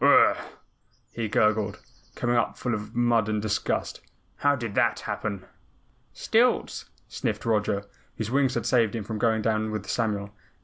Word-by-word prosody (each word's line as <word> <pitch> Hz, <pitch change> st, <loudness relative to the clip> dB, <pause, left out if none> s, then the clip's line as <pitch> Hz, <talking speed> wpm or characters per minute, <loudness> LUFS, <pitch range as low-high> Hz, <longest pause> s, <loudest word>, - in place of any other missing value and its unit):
"Ugh -, -, +7 dB
gr -, -, +7 dB
ugh!" -, -, +6 dB, 0.7 s
he 115 Hz, -2 st, -3 dB
gurgled, 105 Hz, 0 st, +1 dB, 0.4 s
coming 120 Hz, 0 st, 0 dB
up 115 Hz, -, +1 dB
full 125 Hz, -, -2 dB
of 105 Hz, 0 st, -5 dB
mud 120 Hz, -3 st, +2 dB
and 105 Hz, 0 st, 0 dB
disgust. 105 Hz, 0 st, -1 dB, 0.4 s
"How 145 Hz, 0 st, +3 dB
did 115 Hz, -5 st, -4 dB
that -, -, +2 dB
happen?" 100 Hz, -3 st, -4 dB, 0.7 s
"Stilts!" -, -, +1 dB, 0.2 s
sniffed -, -, -3 dB
Roger, 105 Hz, -3 st, +1 dB, 0.3 s
whose 110 Hz, 0 st, -3 dB
wings 135 Hz, -1 st, +2 dB
had -, -, -1 dB
saved 115 Hz, -3 st, +2 dB
him 110 Hz, -, -3 dB
from 110 Hz, +1 st, -5 dB
going 110 Hz, -1 st, +2 dB
down 110 Hz, 0 st, +1 dB
with 105 Hz, -2 st, -4 dB
Samuel. 105 Hz, -4 st, -1 dB
110 Hz, 165 wpm, -26 LUFS, 105-115 Hz, 0.7 s, Ugh